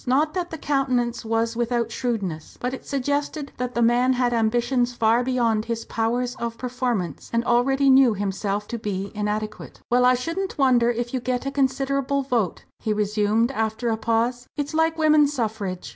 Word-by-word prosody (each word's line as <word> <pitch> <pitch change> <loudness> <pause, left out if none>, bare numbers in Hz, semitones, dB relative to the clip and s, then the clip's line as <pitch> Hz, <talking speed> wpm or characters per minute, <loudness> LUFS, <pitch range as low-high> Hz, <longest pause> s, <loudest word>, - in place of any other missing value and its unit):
Not 295 +5 +2
that 360 -2 -2
the 320 - -6
countenance 255 -5 0
was 225 +1 0
without 235 -1 -1
shrewdness; 200 -11 -3
but 250 +1 -2
it 265 - -8
suggested 285 +2 -2
that 250 0 -3
the 235 - +2
man 245 +2 +3
had 245 -1 +1
ambitions 240 +2 +1
far 230 +1 +3
beyond 235 -4 +1
his 230 -1 -3
powers 240 +2 -1
of 230 -1 -4
performance, 245 -7 -3
and 230 0 0
already 270 +4 +2
knew 265 -4 +6
himself 200 +1 -2
to 235 - -4
be 200 -2 -3
inadequate. 215 0 -4
"Well, 250 +1 +4
I 250 0 +5
shouldn't 335 +10 -3
wonder 250 -4 +4
if 240 +1 -2
you 260 - 0
get 250 +1 -2
a 275 - -2
considerable 275 0 0
vote," 235 -9 -1 0.2
he 215 - -1
resumed, 210 +3 +1
after 220 -1 -1
a 225 - +1
pause; 235 +2 0
"it's 290 +1 -3
like 320 +1 +2
women's 305 -2 +4
suffrage. 215 - -3
240 Hz, 175 wpm, -24 LUFS, 225-265 Hz, 0.2 s, knew